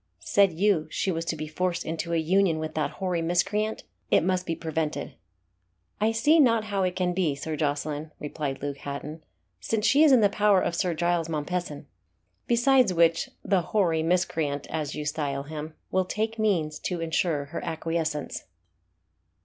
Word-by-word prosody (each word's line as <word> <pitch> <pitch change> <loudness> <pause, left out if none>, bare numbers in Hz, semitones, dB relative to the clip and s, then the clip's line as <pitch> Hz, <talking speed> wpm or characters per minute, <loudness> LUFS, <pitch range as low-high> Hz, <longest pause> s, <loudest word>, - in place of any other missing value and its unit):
"Said 200 -2 +4
you 175 -3 +2
she 190 - -1
was 165 -1 -2
to 165 - -1
be 155 0 -5
forced 175 +2 -2
into 165 +1 -3
a - - +1
union 175 +1 +2
with 155 0 -4
that 155 -2 0
hoary 180 -3 -1
miscreant? 205 +6 0 0.3
It - - +4
must 185 +1 0
be 165 - -1
prevented." 160 -2 -3 0.9
"I 215 +1 +2
see 290 +9 +4
not 230 -6 +4
how 200 -2 -2
it 180 -1 0
can 180 -1 0
be, 175 -6 0
Sir 155 +3 -4
Jocelyn," 150 0 -2
replied 145 -2 -4
Luke 140 -1 -3
Hatton, 145 +3 -6 0.4
"since 220 -1 -1
she 285 +5 +5
is 305 - +6
in 255 -3 +6
the 205 - +6
power 205 -1 +3
of 175 - -1
Sir 175 -1 0
Giles 170 0 0
Mompesson. 155 0 -3 0.6
Besides 240 -4 +4
which, 165 0 +3 0.2
the 195 -3 +3
'hoary 170 -4 +1
miscreant,' 160 -4 0
as 155 -2 -3
you 150 - -4
style 145 -2 -2
him, 155 +1 -7 0.2
will 185 0 +2
take 220 +4 -2
means 165 -8 0
to 180 -2 -3
ensure 160 -2 0
her - - -4
acquiescence." 160 -2 -3
170 Hz, 175 wpm, -26 LUFS, 155-195 Hz, 0.9 s, is